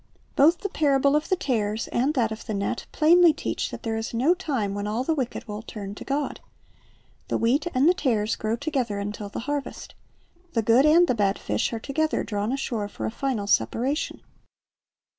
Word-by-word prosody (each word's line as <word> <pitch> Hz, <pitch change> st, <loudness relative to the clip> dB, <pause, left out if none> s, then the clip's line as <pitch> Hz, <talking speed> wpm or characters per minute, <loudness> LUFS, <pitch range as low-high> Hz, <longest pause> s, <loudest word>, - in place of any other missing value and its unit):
Both 325 Hz, +5 st, +4 dB
the 400 Hz, -, -2 dB
parable 280 Hz, -3 st, +2 dB
of 300 Hz, -, 0 dB
the 375 Hz, -, +3 dB
tares 220 Hz, -, -1 dB
and 275 Hz, +6 st, 0 dB
that 230 Hz, -4 st, +1 dB
of 220 Hz, +2 st, -7 dB
the 215 Hz, -, -2 dB
net 200 Hz, +4 st, -3 dB
plainly 335 Hz, +1 st, +6 dB
teach -, -, -3 dB
that -, -, -8 dB
there 225 Hz, -1 st, -2 dB
is 225 Hz, +1 st, -4 dB
no 270 Hz, +9 st, +4 dB
time 270 Hz, -, -2 dB
when 205 Hz, 0 st, -3 dB
all 220 Hz, +4 st, -1 dB
the 320 Hz, -, +1 dB
wicked 260 Hz, -6 st, -3 dB
will 210 Hz, 0 st, -5 dB
turn 205 Hz, -3 st, -7 dB
to -, -, -9 dB
God. 285 Hz, +1 st, -2 dB, 0.9 s
The -, -, 0 dB
wheat 255 Hz, +9 st, +1 dB
and 265 Hz, +4 st, +4 dB
the 355 Hz, -, +6 dB
tares 225 Hz, -10 st, 0 dB
grow 220 Hz, +1 st, -1 dB
together 255 Hz, -6 st, -2 dB
until 205 Hz, 0 st, -5 dB
the -, -, -5 dB
harvest. 290 Hz, +2 st, -4 dB, 0.6 s
The 230 Hz, -, +1 dB
good 240 Hz, +7 st, +5 dB
and 335 Hz, +3 st, +6 dB
the 255 Hz, -, +2 dB
bad 205 Hz, -3 st, +1 dB
fish -, -, -1 dB
are 230 Hz, -, -3 dB
together 310 Hz, +6 st, -1 dB
drawn 205 Hz, +1 st, -2 dB
ashore 240 Hz, -6 st, -2 dB
for 205 Hz, -, -6 dB
a -, -, -2 dB
final 240 Hz, -4 st, -2 dB
separation. 240 Hz, -, 0 dB
245 Hz, 200 wpm, -25 LUFS, 215-290 Hz, 0.9 s, plainly